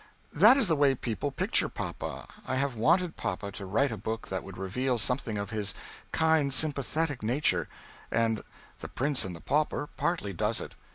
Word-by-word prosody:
That 215 - +8
is 265 - +3
the 165 - +3
way 140 -2 +4
people 115 -6 -2
picture - - +1
papa, - - -5 0.2
I 130 - 0
have 135 0 0
wanted 170 +9 +2
papa 100 +2 -3
to 100 0 -7
write 130 +9 +2
a 110 - -4
book 110 +3 -4
that 95 -1 -2
would 95 -1 -9
reveal 120 +7 0
something 115 -2 -1
of 100 -1 -4
his 105 -3 -2 0.4
kind 160 -3 +3
sympathetic 145 0 -1
nature, 125 +8 +1 0.4
and 115 -1 +1 0.4
"The - - -6
Prince 135 -2 +1
and 90 -2 -5
the 85 - -11
Pauper" 150 0 0
partly 165 - -1
does 105 +5 0
it. - - -7
125 Hz, 180 wpm, -29 LUFS, 105-150 Hz, 0.4 s, That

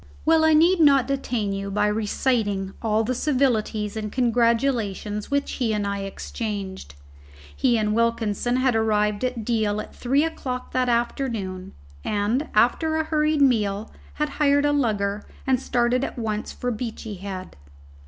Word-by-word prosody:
Well, 320 0 +4
I 315 0 +5
need 340 +4 +5
not 275 -5 +5
detain 245 -7 -1
you 195 0 -4
by 210 +1 +1
reciting 210 -2 0
all 220 -1 +1
the 245 +3 -1
civilities 230 -6 0
and 215 -1 -4
congratulations 230 -4 0
which 280 0 0
he 235 -4 -1
and 205 -1 -1
I 200 0 -2
exchanged. 195 - -5 0.6
He 240 -2 +2
and 210 -1 0
Wilkinson 230 0 0
had 255 -2 +2
arrived 210 -1 +1
at 250 -3 -2
Deal 215 -3 0
at - - -8
three 270 +4 +1
o'clock 255 -6 -4
that 255 -1 +1
afternoon, 230 -6 -2 0.3
and, 215 +8 0
after 315 +8 +3
a 315 - +1
hurried 305 -1 +2
meal, 215 -5 +1 0.2
had 300 0 -1
hired 285 0 +4
a 290 - +3
lugger 210 -6 0 0.2
and 260 -2 +2
started 245 +1 +1
at - - -4
once 215 -2 -3
for 245 - -3
Beachy 225 -1 -5
Head. 185 -1 -7
230 Hz, 155 wpm, -24 LUFS, 210-260 Hz, 0.6 s, I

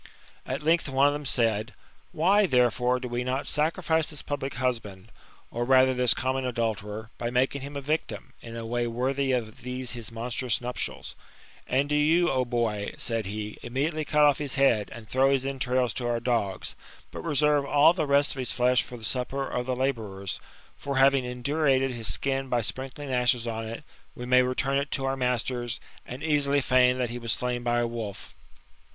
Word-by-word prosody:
At - - -3
length 165 -1 +2
one 135 +1 +3
of 145 - +4
them 145 -1 -4
said: 115 -2 +1 0.2
" - - -34
Why, 195 +6 +3
therefore, 125 -1 +2
do 125 - -5
W6 120 0 -2
not 130 +2 -2
sacrifice 160 +1 +1
this 150 -3 -6
public 140 -3 -4
husband, 115 -5 -3 0.4
or 120 - -2
rather 130 +1 +5
this 125 -1 +4
common 130 +1 -1
adulterer, 110 -3 -3
by 120 - -2
making 130 +3 0
him 140 +2 -8
a - - -4
victim, 145 -2 -3
in 115 0 -9
a 115 -1 -5
way 120 +1 -1
worthy 130 +3 0
of 115 -4 -2
these 125 0 -4
his 120 -2 -5
monstrous 120 +1 -1
nuptials? 125 0 -4 0.5
And 135 +3 +1
do 150 - 0
you, 160 +4 +3
O 130 -1 +1
boy," 115 -4 -2
said 115 -4 -1
he, 105 +1 -5
" - - -20
immedi 135 +6 -1
ately 155 -1 -3
cut 150 0 +3
off 145 -1 +4
his 145 -3 -2
head, 120 -7 +3
and 115 -2 -10
throw 130 +3 +3
his 135 -1 +1
entrails 130 -3 0
to 120 - -3
our 120 -1 0
dogs; 115 -6 -1 0.4
but - - -7
reserve 150 -2 +2
all 145 +3 +5
the 160 -4 -1
rest 140 0 +4
of 135 - -5
his 125 - +1
flesh 125 0 +3
for 125 - -8
the 115 - -13
supper 135 +3 -1
of 125 0 -3
the 130 - 0
laboufer^; 110 -7 -2 0.4
for, 140 -1 -3
having 135 -1 +4
indurated 135 +1 +1
his 115 -3 -1
skin 135 -1 0
by 120 -1 +1
sprinkling 135 +4 -3
ashes 125 -1 +2
on 115 -1 -4
it, 115 +6 -7 0.3
We 125 - -7
may 125 +1 +5
return 130 +2 0
it 140 0 -3
to 135 - -1
our 135 0 0
masters, 125 -1 -1 0.3
and 130 +4 -7
easily 145 -2 +3
feign 125 -1 +4
that 125 -2 -1
he 120 - -5
was 115 -2 0
s^ainf 125 -1 -2
by 120 0 +1
a - - +1
wolf." 115 -4 -6
125 Hz, 200 wpm, -27 LUFS, 120-140 Hz, 0.5 s, rather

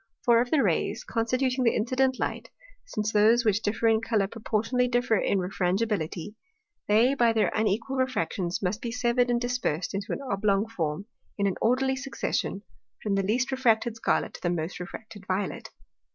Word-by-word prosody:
For, 235 -1 +5
of 245 - -2
the 295 -1 +3
Rays, - - 0
constituting 255 - 0
the 230 - +3
incident 260 +3 +1
Light, - - -3 0.4
since 215 - -2
those 225 +3 +4
which 210 0 +2
differ 225 +2 0
in 220 -1 +3
Colour 225 -3 +1
proportionally 230 +4 -1
differ 245 -2 +1
in 200 - +1
Refrangibility, 185 0 -1 0.5
they 225 +6 +4
by 235 -4 +3
their 220 -1 +2
unequal 220 +4 0
Refractions 195 -8 -1
must 195 +4 -1
be 235 - -3
severed 245 0 +1
and 240 0 +2
dispersed 245 -10 -2
into 195 +1 -4
an - - -3
oblong 200 -1 +1
Form, 170 -4 -3 0.3
in 200 - +1
an 195 - +2
orderly 265 +3 +2
succession, 265 -6 -3 0.4
from 210 - 0
the 195 - +2
least 245 +7 0
refracted 235 -3 +2
Scarlet 225 - 0
to - - -10
the 175 - 0
most 170 +1 -3
refracted 200 +3 -9
Violet. 190 +1 -2
225 Hz, 170 wpm, -27 LUFS, 200-245 Hz, 0.5 s, For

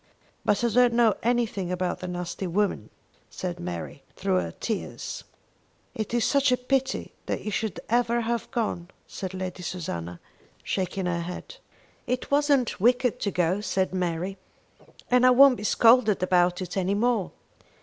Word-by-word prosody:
"But 205 +2 +1
I 235 - +3
don't 240 +1 +4
know 230 -3 +5
anything 225 -6 0
about 180 0 -2
the 185 - -5
nasty 180 +1 -4
women!" 200 +4 -1 0.4
said 180 -2 -5
Mary, 85 -2 -6
through 95 - 0
her 85 -2 -3
tears. - - -5 0.7
"It 215 -2 -4
is 240 -1 +1
such 280 -2 +3
a 250 - +3
pity 265 +1 -1
that - - -2
you 215 - -3
should 220 -1 -2
ever 235 0 +2
have 235 +1 -2
gone," 215 -8 -2 0.2
said 190 -1 -6
Lady 185 -1 -5
Susanna, 90 - -5 0.4
shaking 190 0 -2
her 175 -1 0
head. 180 - -7 0.5
"It 250 +2 -2
wasn't 280 -7 +2
wicked 245 +1 +3
to 205 - -1
go," 180 +1 0
said 190 -3 -1
Mary, 180 +1 -2 0.7
"and 250 0 +5
I 255 - +7
won't 260 0 +7
be 210 - -7
scolded 225 -2 +4
about 180 0 +2
it 180 - -7
any 190 +1 0
more. 225 -3 +1
200 Hz, 160 wpm, -26 LUFS, 180-240 Hz, 0.7 s, I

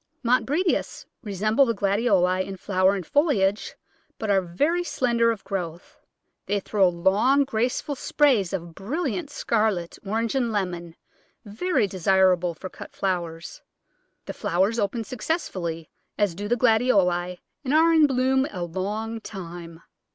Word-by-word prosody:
Montbretias 280 +9 0 0.2
resemble 215 +3 +1
the 230 - 0
Gladioli 195 -3 +2
in 195 0 -7
flower 190 0 +2
and 185 -4 -5
foliage, 215 - +1 0.4
but 215 -2 -2
are 195 -1 +4
very 290 - 0
slender 235 -7 +1
of 225 -3 -2
growth. 175 -3 -6 0.5
They 205 0 +1
throw 195 -1 +2
long, 195 +11 +3
graceful 250 +3 -1
sprays 260 - +2
of 170 -3 -5
brilliant 285 - -3
scarlet, 215 -10 -1
orange, 220 +3 -1
and 250 -4 0
lemon, 175 -5 -3 0.5
very 245 - 0
desirable 185 -2 +2
for 185 - -7
cut - - -11
flowers. 170 -4 -3 0.6
The - - -5
flowers 195 +7 0
open 220 +3 -1
successively, 195 - -4 0.3
as 205 -4 +1
do 205 +4 -5
the 240 +3 +1
Gladioli, 195 -7 +2 0.3
and 265 - -2
are 325 +2 +5
in 315 -2 +6
bloom 265 +1 +2
a 180 -3 -5
long 210 +6 -4
time. 170 -5 -9
205 Hz, 135 wpm, -25 LUFS, 185-250 Hz, 0.6 s, in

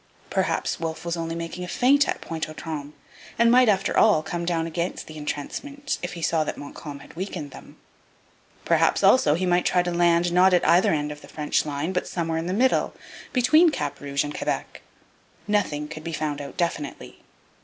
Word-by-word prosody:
Perhaps 185 -4 0
Wolfe 160 0 -4
was 170 0 -1
only 165 -1 -3
making 170 +2 -5
a - - -5
feint 275 +9 +3
at - - -2
Pointe 160 -1 -4
aux - - -8
Trembles, 150 -2 -6 0.4
and 235 0 +5
might, 250 -1 +6
after 195 -2 +1
all, 205 -8 +5
come 170 +1 -4
down 165 -1 0
against 170 +2 -3
the 155 - -11
entrenchments 275 - -4
if 180 - -4
he 170 -2 -7
saw 160 -1 +2
that - - -4
Montcalm 145 0 -8
had - - -14
weakened 175 -5 -5
them. - - -13 0.9
Perhaps, - - +2
also, 260 -12 +5
he 185 +3 -1
might 180 0 +2
try 180 -1 +2
to 175 - -2
land, 170 0 +3
not 180 +1 +5
at 175 - +1
either 175 +2 +5
end 150 -1 -1
of 150 0 -9
the - - -13
French 150 0 -1
line, 145 +5 -2
but 180 - -1
somewhere 165 -2 -2
in 165 - -4
the - - -1
middle, 250 +7 +2 0.4
between 310 +7 +5
Cap 300 - -3
Rouge 140 0 -1
and 145 0 -6
Quebec. - - -3 0.7
Nothing 185 -8 0
could 155 0 -8
be 165 - -5
found 150 -2 -2
out 140 - -9
definitely. 170 -5 -3
170 Hz, 200 wpm, -24 LUFS, 155-185 Hz, 0.9 s, might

